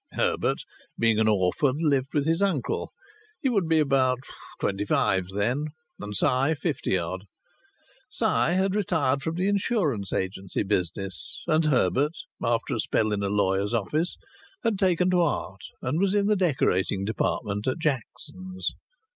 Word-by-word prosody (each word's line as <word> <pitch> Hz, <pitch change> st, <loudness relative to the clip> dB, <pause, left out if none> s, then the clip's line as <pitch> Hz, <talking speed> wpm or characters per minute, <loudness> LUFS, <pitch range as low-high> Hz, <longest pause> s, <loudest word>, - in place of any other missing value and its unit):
Herbert, -, -, 0 dB, 0.3 s
being 115 Hz, -2 st, +3 dB
an 110 Hz, -, +3 dB
orphan, 105 Hz, +7 st, +2 dB
lived 140 Hz, -4 st, +1 dB
with 145 Hz, -1 st, +2 dB
his 165 Hz, +3 st, +1 dB
uncle. 175 Hz, -11 st, 0 dB, 0.5 s
He 270 Hz, -, +1 dB
would 200 Hz, -9 st, +1 dB
be 160 Hz, -, +4 dB
about 135 Hz, -4 st, +3 dB, 0.4 s
twenty 100 Hz, +1 st, -1 dB
five 95 Hz, -2 st, +1 dB
then, 110 Hz, +10 st, 0 dB, 0.3 s
and 105 Hz, 0 st, -5 dB
Si 135 Hz, -, +2 dB
fifty 145 Hz, -, -1 dB
odd. 90 Hz, +3 st, -4 dB, 0.8 s
Si -, -, -2 dB
had 185 Hz, +3 st, +2 dB
retired 155 Hz, -9 st, +1 dB
from 160 Hz, +2 st, -2 dB
the 185 Hz, +3 st, +1 dB
insurance 185 Hz, -, 0 dB
agency 95 Hz, 0 st, -2 dB
business, 95 Hz, -2 st, -2 dB
and 155 Hz, +1 st, +3 dB
Herbert, 145 Hz, +1 st, +2 dB, 0.3 s
after 115 Hz, +3 st, 0 dB
a 120 Hz, -, -1 dB
spell 110 Hz, 0 st, +1 dB
in 105 Hz, -1 st, 0 dB
a 100 Hz, -, 0 dB
lawyer's 100 Hz, +1 st, +1 dB
office, 150 Hz, -, -1 dB, 0.5 s
had 225 Hz, -4 st, +1 dB
taken 185 Hz, -1 st, +3 dB
to 180 Hz, -1 st, +4 dB
art 100 Hz, -, -1 dB, 0.2 s
and 135 Hz, +6 st, 0 dB
was 195 Hz, +1 st, +2 dB
in 205 Hz, -1 st, +3 dB
the 210 Hz, +1 st, +3 dB
decorating 100 Hz, -, +1 dB
department 105 Hz, -1 st, -1 dB
at 130 Hz, -, +1 dB
Jackson's. 165 Hz, +5 st, -3 dB
135 Hz, 150 wpm, -26 LUFS, 100-170 Hz, 0.8 s, be